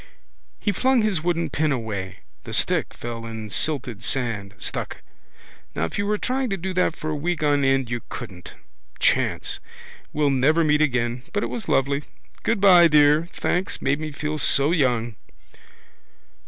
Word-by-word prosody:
He 205 - 0
flung 255 +2 +2
his 200 -7 +1
wooden 170 -2 -1
pen 155 +2 +1
away. 100 -7 -4 0.2
The - - -8
stick - - +1
fell 115 -1 -6
in 110 -2 -7
silted 125 -7 -1
sand, 110 -6 -2
stuck. - - -5 0.7
Now - - -1
if 80 - -5
you 205 - 0
were 210 0 +1
trying 260 +3 -1
to 195 - -1
do 190 +2 -4
that 180 -2 +1
for 155 - -4
a - - -1
week 160 +2 -2
on 145 -1 +3
end 135 -2 +1
you 120 -1 -2
couldn't. 95 -8 -8 0.4
Chance. - - +1 0.5
We'll 145 -1 +1
never 145 +5 +3
meet 150 -1 +3
again. 125 -4 0
But 205 - 0
it - - -3
was 235 - -5
lovely. 140 +2 +1 0.4
Goodbye, 195 -6 +6
dear. 150 +2 +4
Thanks. 180 +2 -1
Made 140 +2 0
me 155 -1 -4
feel 150 +1 -3
so 140 +2 +4
young. 120 - +1
145 Hz, 165 wpm, -23 LUFS, 120-170 Hz, 0.7 s, Goodbye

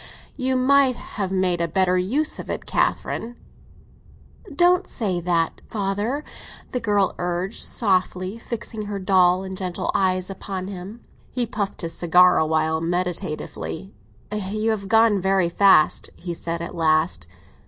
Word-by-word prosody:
"You 260 -1 0
might 260 0 +4
have 195 -5 -5
made 185 -2 +1
a 170 - +1
better 185 +2 +2
use 245 +13 0
of - - -7
it, - - -4
Catherine." 235 +2 -1 1.1
"Please 340 -8 -12
don't 355 +1 +4
say 190 -6 -2
that, 170 -1 0
father," 210 +7 -2 0.5
the 250 - -1
girl 205 -4 +1
urged 180 +3 -2
softly, 185 0 0
fixing 220 -2 -5
her 205 -1 -3
dull 185 -1 +3
and 190 0 -6
gentle 185 -2 -3
eyes 185 0 +1
upon 190 0 -5
him. 200 +4 -8 0.3
He 250 -1 -1
puffed 210 -4 -3
his 165 -1 -4
cigar 180 +2 +5
awhile, 160 0 +1
meditatively. 175 +1 -3 0.4
"You 210 +2 -1
have 200 -3 -3
gone 220 -2 +4
very 190 -2 +2
fast," 190 -3 +4
he 175 -1 -5
said 170 0 -4
at 170 - -6
last. 155 - +1
190 Hz, 145 wpm, -23 LUFS, 175-215 Hz, 1.1 s, cigar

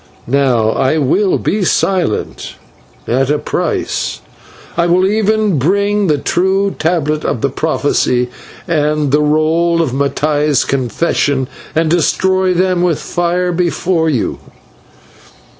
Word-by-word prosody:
Now, 120 -4 +2
I 135 +6 +1
will 170 +8 +2
be 205 0 -1
silent 180 - -1 0.5
at 130 +3 +1
a 150 - +2
price. - - -2 0.5
I 170 0 +1
will 180 +2 +3
even 215 -3 +1
bring 200 +6 +1
the 150 -2 +2
true 190 +5 0
tablet 155 -2 0
of 115 - -2
the 140 - 0
prophecy 125 -5 0 0.4
and 150 -3 0
the 150 +1 +3
roll 160 +3 +2
of 160 -6 0
Mattai's 145 +1 +1
confession, 135 +1 0 0.3
and 160 +1 +2
destroy 185 +3 +1
them 185 0 +1
with 175 -4 +1
fire 175 +1 -1
before 170 -1 0
you." 130 -7 -1
160 Hz, 120 wpm, -14 LUFS, 140-180 Hz, 0.5 s, will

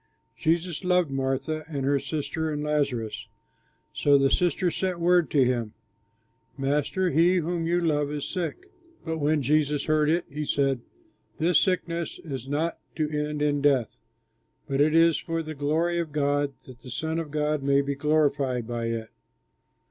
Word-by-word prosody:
Jesus 170 +2 0
loved 180 -4 +2
Martha, 135 +4 -1
and 140 -4 -3
her 140 0 +2
sister, 160 +2 -3
and 150 0 -3
Lazarus. 140 -7 -1 0.7
So 145 -1 +4
the 135 -1 +3
sisters 175 +1 +1
sent 185 -2 -1
word 175 0 +3
to 140 -4 +4
him, 120 -4 -1 0.8
"Master, 150 +7 0
he 170 +3 +4
whom 170 -1 -1
you 175 +1 +2
love 150 -4 +1
is 145 -1 -3
sick." 200 - -4 0.3
But 160 -1 -2
when 150 0 +1
Jesus 150 +1 +1
heard 155 -1 +2
it 170 +2 +1
he 150 +2 -5
said, 135 -3 +1 0.6
"This 165 +1 +4
sickness 170 -3 -1
is 135 -6 -7
not 155 +4 -1 0.2
to 155 -1 -1
end 150 0 -1
in 145 -1 +1
death, 135 -5 +2 0.7
but 135 +1 +1
it 155 +2 +3
is 165 -1 +5
for 165 -1 -3
the 155 0 -6
glory 160 +4 0
of 165 -3 -3
God, 145 -1 0
that 130 -2 -13
the 125 - -11
Son 160 +6 -2
of 160 -2 -5
God 150 0 0
may 140 0 +3
be 140 0 -2
glorified 140 -4 +1
by 120 -1 -3
it." 115 -1 -3
150 Hz, 165 wpm, -26 LUFS, 140-165 Hz, 0.8 s, is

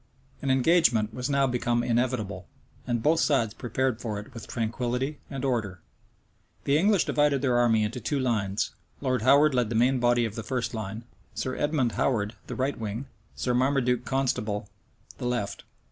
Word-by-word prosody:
An 140 - -2
engagement 130 -6 +3
was 125 +3 -3
now 140 -1 +3
become 120 -2 0
inevitable, 115 -7 -1 0.4
and 120 -2 -1
both 160 +2 +3
sides 115 -8 +2
prepared 120 0 -1
for 105 -3 -3
it 105 +5 -11
with 115 -4 -9
tranquillity 125 +5 -2
and 135 -1 -4
order.[*] 110 -8 -1 0.8
The 140 - +2
English 195 +3 +3
divided 145 -2 +2
their 125 -3 +3
army 115 -3 +3
into 115 +4 -3
two 140 +5 -1
lines: 110 -6 0 0.3
Lord 130 -4 0
Howard 140 +5 +5
led 125 -4 +1
the 115 - -2
main 125 +3 +3
body 120 0 +3
of 110 - -4
the 115 - -5
first 125 +1 -2
line, 110 0 -5 0.3
Sir 130 - -2
Edmond 145 -5 +1
Howard 110 -4 0
the - - -5
right 135 +2 -1
wing, 110 +4 -4 0.3
Sir 125 - -1
Marmaduke 125 -1 +2
Constable 120 -7 -1 0.5
the 125 - -2
left. 120 -5 -3
125 Hz, 170 wpm, -27 LUFS, 115-135 Hz, 0.8 s, Howard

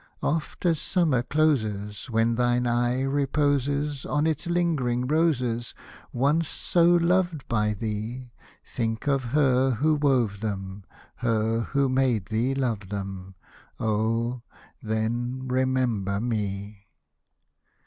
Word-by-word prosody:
Oft 160 +3 -2
as 165 -3 +3
summer 160 -9 +1
closes, 110 -8 0
When 115 0 +2
thine 120 +1 +1
eye 120 +2 +1
reposes 145 0 0
On 150 +1 0
its 160 +1 -1
lingering 155 -9 0
roses, 125 -6 0 0.4
Once 145 +6 +1
so 170 +2 +1
loved 175 -2 +2
by 105 -3 +1
thee. 110 +4 -5 0.3
Think 115 +1 -3
of 135 -2 +1
her 130 0 +3
who 155 +7 +2
wove 130 -9 +1
them, 100 -2 -5 0.3
Her 115 -1 +1
who 140 +4 0
made 130 -7 +1
thee 120 +5 0
love 115 -8 -2
them, 95 -2 -6 0.4
Oh! 115 +3 0 0.4
then 120 +4 -2
remember 125 -6 0
me. 105 -3 -3
125 Hz, 110 wpm, -26 LUFS, 110-140 Hz, 0.4 s, as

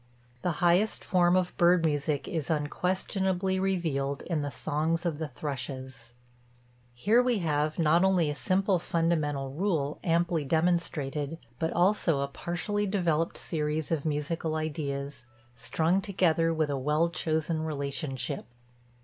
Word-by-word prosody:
The 180 - 0
highest 180 +6 +3
form 180 -1 +3
of 185 -1 0
bird 175 -1 +4
music 145 -1 0
is 160 -5 -3
unquestionably 185 +4 0
revealed 160 -8 -1
in 165 -4 -1
the 145 - -2
songs 160 +4 -1
of 160 -3 -1
the 160 - -2
thrushes. 130 -4 -6 0.8
Here 215 - +4
we 250 -2 +1
have 155 -3 0
not 165 +1 +4
only 185 -4 +3
a - - -2
simple 190 +3 +1
fundamental 155 -5 0
rule, 155 -3 -1
amply 170 -1 +1
demonstrated, 160 -2 0 0.2
but 160 - 0
also 175 -5 +3
a 140 - 0
partially 190 +8 -2
developed 170 -5 0
series 155 -1 -2
of 155 -4 0
musical 155 +1 -2
ideas, 145 -4 -4 0.3
strung 165 +9 +1
together 170 -5 +2
with 155 -2 0
a 140 - -1
well 150 +5 +2
chosen 160 -1 -1
relationship. 140 -4 -3
160 Hz, 130 wpm, -29 LUFS, 145-175 Hz, 0.8 s, bird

